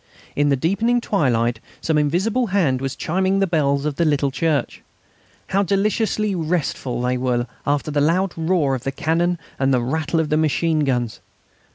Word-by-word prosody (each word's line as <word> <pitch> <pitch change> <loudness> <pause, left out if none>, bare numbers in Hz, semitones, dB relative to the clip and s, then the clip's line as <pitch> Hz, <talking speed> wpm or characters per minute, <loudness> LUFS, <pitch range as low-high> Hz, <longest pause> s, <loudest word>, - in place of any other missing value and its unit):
In 145 0 +2
the 140 - +3
deepening 200 - +1
twilight 120 - +1 0.2
some 160 - 0
invisible 190 - +1
hand 165 -10 +1
was 135 0 -3
chiming 185 +8 0
the 195 - +3
bells 145 -5 +1
of 150 -2 -2
the 170 - +2
little 145 -3 +1
church. 155 0 -1 0.7
How 195 +1 +2
deliciously 210 +2 0
restful 160 -7 -2
they 125 0 0
were 125 -1 0 0.2
after 145 +1 0
the 145 0 +1
loud 175 +5 +1
roar 160 -4 +1
of 130 -2 -3
the 135 - -2
cannon 170 +5 0 0.2
and 135 0 +2
the 130 - +3
rattle 160 +5 -1
of 160 -2 0
the 155 - +2
machine 160 +1 +1
guns! 120 -4 -1
155 Hz, 175 wpm, -21 LUFS, 135-185 Hz, 0.7 s, the